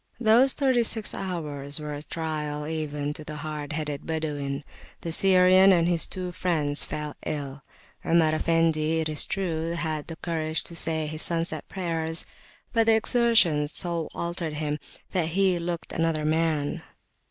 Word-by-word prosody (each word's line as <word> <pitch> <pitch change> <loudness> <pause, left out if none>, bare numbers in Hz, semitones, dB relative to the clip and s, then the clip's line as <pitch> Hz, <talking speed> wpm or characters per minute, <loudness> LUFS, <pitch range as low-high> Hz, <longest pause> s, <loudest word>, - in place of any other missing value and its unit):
Those 245 +3 +5
thirty 260 -4 +2
six 225 -2 +2
hours 150 -6 -3
were 150 -1 -5
a 145 - -6
trial 150 -2 -4
even 150 -2 -3
to 155 - -7
the 150 0 -7
hard 150 0 -5
headed 150 -2 -3
Badawin. 145 -3 -3 0.4
The 165 - -4
Syrian 185 +2 +6
and 170 -2 +4
his 170 -2 +1
two 180 -1 -4
friends 155 -5 +1
fell 150 -1 -5
ill. 140 -2 -4 0.4
Omar 165 -2 +3
Effendi, 160 -1 +2
it 160 -1 -1
is 155 -1 0
true, 170 -4 -2
had 155 -3 -3
the 165 - -6
courage 160 -1 -2
to 170 - -9
say 160 -1 -1
his 155 +1 -3
[p.210] - - +5
sunset 170 0 -2
prayers, 165 -3 0 0.5
but 225 -1 +3
the 225 - +6
exertion 220 - +3
so 170 +1 -1
altered 170 -2 -3
him 150 0 -2 0.3
that 175 -4 0
he 190 -3 +3
looked 170 0 -4
another 165 -2 0
man. 155 -2 0
160 Hz, 160 wpm, -26 LUFS, 150-175 Hz, 0.5 s, Syrian